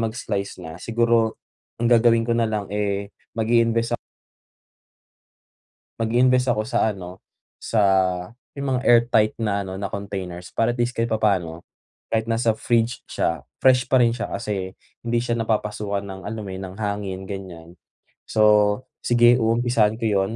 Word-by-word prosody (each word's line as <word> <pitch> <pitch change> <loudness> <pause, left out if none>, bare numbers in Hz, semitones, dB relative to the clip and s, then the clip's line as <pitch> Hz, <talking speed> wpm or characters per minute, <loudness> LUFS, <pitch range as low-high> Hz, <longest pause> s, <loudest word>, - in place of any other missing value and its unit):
mag-slice 110 -3 -3
na 80 0 -8
siguro 115 -1 +1 0.4
ang 120 - +1
gagawin 115 0 +4
ko 120 - 0
nalang, 110 -3 0
eh, 100 -1 -2 0.3
mag-i-invest 115 0 +2
ak - - -37 2.0
mag-i-invest 125 +2 +3
ako 110 -1 -1
sa, 110 -3 +1
ano, 90 0 -10 0.3
sa 110 - 0 0.7
may - - -8
mga 130 -1 +1
airtight 115 -2 +4
na, 100 -3 0
ano, 95 0 -6
na 100 - -2
containers 95 -3 -6
para 115 +1 +1
at - - -12
least, 120 +1 +1
kahit 115 0 0
papaano, 95 -7 0 0.5
kahit 110 0 0
nasa 115 0 +2
fridge 120 +1 0
siya, 85 -1 -1 0.2
fresh 125 -1 +5
pa - - +2
rin 115 - +3
siya 120 0 -3
kasi 95 -4 -4 0.3
hindi 120 0 +1
siya 120 -1 -1
napapasukan 105 -2 -1
ng, 95 -1 -8
alam 110 0 -5
mo 95 - -7
'yon, 95 +1 -6
ng 95 +3 -11
hangin, 100 -3 -3
ganiyan. 95 -4 -8 0.6
So, 110 - 0 0.6
sige 120 0 +5
umumpisahan 115 -1 +2
ko 115 - -2
'yon, 100 +1 0
110 Hz, 150 wpm, -23 LUFS, 100-115 Hz, 2.0 s, fresh